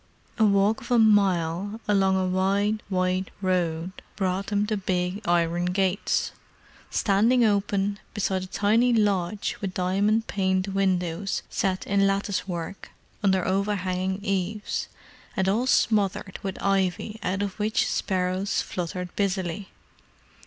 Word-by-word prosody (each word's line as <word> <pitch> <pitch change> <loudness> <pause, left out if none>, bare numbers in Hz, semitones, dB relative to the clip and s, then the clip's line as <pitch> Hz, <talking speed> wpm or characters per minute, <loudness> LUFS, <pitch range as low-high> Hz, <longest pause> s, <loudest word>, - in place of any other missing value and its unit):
A 220 - +6
walk 200 +1 +3
of - - -11
a 245 - +4
mile 200 -2 +2
along 195 -2 +3
a 185 - +1
wide 200 +3 +1
white 185 0 0
road 180 -2 0 0.2
brought 190 0 -1
them 205 -1 +1
to 215 0 -1
big 185 0 -1
iron 175 0 +2
gates, 190 +2 0 0.6
standing 230 +5 +3
open, 200 -1 +1 0.2
beside 190 -2 0
a 185 - -6
tiny 220 +6 +2
lodge 205 -2 0
with 195 -2 -4
diamond 200 +5 +1
paned 190 -1 0
windows 190 -1 0
set 190 -1 -1
in 195 0 +3
lattice 195 -1 -1
work, 175 +1 -5 0.3
under 190 -3 +2
overhanging 190 0 -1
eaves; 195 +1 -2 0.5
and 190 -1 +1
all 225 +6 +1
smothered 200 -5 +1
with 195 -1 -4
ivy 195 +2 0
out 190 +2 -1
of 200 0 -5
which 215 +3 +1
sparrows 185 +2 0
fluttered 180 0 -4
busily. 190 -1 -2
195 Hz, 130 wpm, -26 LUFS, 185-205 Hz, 0.6 s, A